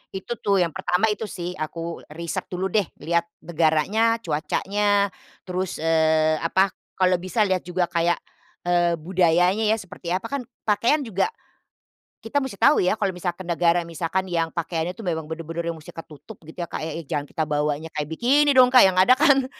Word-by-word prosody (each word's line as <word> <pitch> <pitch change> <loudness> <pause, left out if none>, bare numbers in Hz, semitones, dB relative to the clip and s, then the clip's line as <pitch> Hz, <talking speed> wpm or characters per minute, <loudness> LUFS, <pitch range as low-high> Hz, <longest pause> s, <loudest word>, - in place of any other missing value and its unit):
Itu 220 +4 -5
tuh 195 -3 +2
yang 165 - -2
pertama 190 +3 +1
itu 215 +1 -4
sih. 175 -2 -5
Aku 165 +2 -5 0.2
riset 170 0 -4
dulu 185 +1 -3
deh. 205 -6 +2 0.2
Lihat 170 +1 +1 0.2
negaranya, 170 +8 +2
cuacanya, 200 +6 0 0.3
terus, 185 0 -3
eee, 160 -1 +2
apa, 190 +3 +2 0.2
kalau 185 -1 +2
bisa 185 +5 0
lihat 185 -3 -1
juga 180 0 0
kayak, 170 0 +2 0.5
eee, 175 -1 +2
budayanya 180 +4 +2
ya 220 - +4
seperti 185 -4 -10
apa. 230 +7 -5
Kan 245 - -9 0.2
pakaian 235 +8 +2
juga 220 - 0 1.0
kita 285 +6 0
musti 265 -7 -5
tahu 290 - +5
ya 185 +4 +2
kalau 200 -3 -1
misalkan 180 +1 -4
negara, 170 0 +2
misalkan 170 +3 -2
yang 165 -2 0
pakaiannya 170 +1 -3
tuh 225 - -9
memang 160 -2 -2
benar-benar 165 +1 -4
yang 165 - -3
mustinya 160 +1 -10
ketutup, 155 +7 -13
gitu 170 +2 -5
ya - - -8
Kak, - - -6
e 160 +1 -5
jangan 145 - -2
kita 160 - -2
bawanya 150 +1 -1
kayak 150 0 -3
bikini 280 - +3
dong 250 0 +7
Kak, 250 - +9
yang 185 - -2
ada 190 +7 +6
kan 275 -2 +4
180 Hz, 180 wpm, -23 LUFS, 165-205 Hz, 1.0 s, Kak